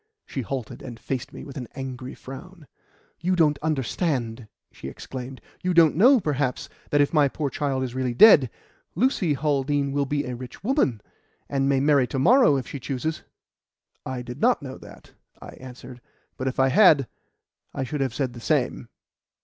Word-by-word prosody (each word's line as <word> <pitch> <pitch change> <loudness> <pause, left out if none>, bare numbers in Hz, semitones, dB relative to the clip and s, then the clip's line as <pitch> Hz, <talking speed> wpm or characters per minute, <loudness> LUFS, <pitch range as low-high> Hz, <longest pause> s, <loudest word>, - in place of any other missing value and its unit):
She 135 - -4
halted, 125 0 -5
and 120 -3 -9
faced 130 +1 -4
me - - -9
with 140 - -10
an 125 -3 -5
angry 130 -1 -6
frown. 170 +5 -11 0.5
"You 185 +2 0
don't 150 -4 +3
understand!" 130 -5 -2 0.2
she - - -9
exclaimed. 130 0 -8 0.2
"You 180 -1 -1
don't 165 -4 +6
know, 250 - +6
perhaps, 145 - -2 0.2
that 145 - +3
if 145 - +1
my 150 -3 +5
poor 140 0 -3
child 135 -1 -1
is 125 -2 -4
really 130 -2 -2
dead, 145 - +7 0.5
Lucy 190 - +1
Haldean 140 -1 0
will 140 0 0
be 145 +1 -1
a 125 -1 -4
rich 125 +6 -10
woman, 200 - +1 0.5
and 135 -1 0
may 135 -1 +3
marry 140 -2 +3
to 135 - -4
morrow 240 - +5
if 130 - -4
she 140 - -6
chooses?" 140 +5 -3 0.8
"I 130 -1 -5
did 125 +3 -9
not 245 -10 +3
know 130 -1 -8
that," - - -15 0.3
I - - -10
answered, 125 -1 -12 0.3
"but 130 - -4
if 130 - -3
I 135 0 +4
had, 150 - +5 0.6
I 135 - -3
should 140 +3 -4
have 130 -3 -1
said 130 -4 -2
the 120 - -9
same." - - -1
135 Hz, 180 wpm, -24 LUFS, 130-150 Hz, 0.8 s, dead